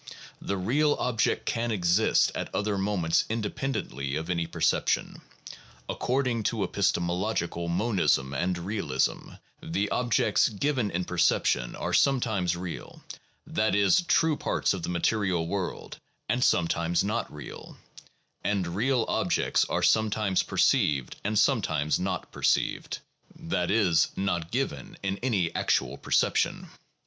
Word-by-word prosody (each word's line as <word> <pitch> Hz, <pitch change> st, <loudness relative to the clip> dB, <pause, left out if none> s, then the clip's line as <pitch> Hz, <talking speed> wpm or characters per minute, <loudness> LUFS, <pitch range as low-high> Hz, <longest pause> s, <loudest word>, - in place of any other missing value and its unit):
The 100 Hz, -, -2 dB
real 145 Hz, +11 st, +2 dB
object 120 Hz, -4 st, 0 dB
can 120 Hz, 0 st, -1 dB
exist 95 Hz, 0 st, +3 dB
at -, -, -4 dB
other 105 Hz, 0 st, 0 dB
moments 95 Hz, -4 st, +1 dB
inde 110 Hz, -2 st, -2 dB
pendently 70 Hz, -, -3 dB
of 80 Hz, +3 st, -4 dB
any 85 Hz, -2 st, -1 dB
perception. -, -, 0 dB, 0.7 s
According 125 Hz, -3 st, 0 dB
to -, -, 0 dB
epistemological 85 Hz, -1 st, -1 dB
monism 90 Hz, -, +1 dB
and 90 Hz, +6 st, -1 dB
realism, 100 Hz, +4 st, -2 dB, 0.3 s
the 100 Hz, +5 st, -2 dB
objects 120 Hz, -3 st, +2 dB
given 125 Hz, +1 st, -1 dB
in 90 Hz, 0 st, -2 dB
perception 85 Hz, -8 st, +1 dB
are -, -, -3 dB
some 135 Hz, -2 st, +4 dB
times 95 Hz, -8 st, -1 dB
real, 90 Hz, -1 st, -7 dB, 0.4 s
that 110 Hz, -2 st, 0 dB
is, 100 Hz, -, +4 dB
true 160 Hz, -2 st, +2 dB
parts -, -, 0 dB
of 95 Hz, -, -4 dB
the -, -, -4 dB
material 90 Hz, -1 st, 0 dB
world, 95 Hz, +1 st, -4 dB, 0.3 s
and 120 Hz, +4 st, +1 dB
some 85 Hz, -1 st, +3 dB
times 85 Hz, +1 st, 0 dB
not 110 Hz, +3 st, -2 dB
real; 75 Hz, -2 st, -10 dB, 0.7 s
and 95 Hz, -4 st, -1 dB
real 120 Hz, +2 st, +1 dB
objects -, -, +1 dB
are -, -, -2 dB
sometimes 105 Hz, -3 st, +2 dB
perceived 75 Hz, -, +1 dB
and 105 Hz, +1 st, 0 dB
sometimes 75 Hz, -5 st, +2 dB
not 90 Hz, -1 st, -3 dB
perceived, -, -, 0 dB, 0.4 s
that 90 Hz, +1 st, -2 dB
is, 90 Hz, -6 st, +3 dB
not 85 Hz, -4 st, -1 dB
given 115 Hz, -, -3 dB
in 95 Hz, 0 st, -2 dB
any 100 Hz, -10 st, 0 dB
actual -, -, 0 dB
per -, -, -13 dB
ception. -, -, +1 dB
100 Hz, 135 wpm, -27 LUFS, 85-110 Hz, 0.7 s, some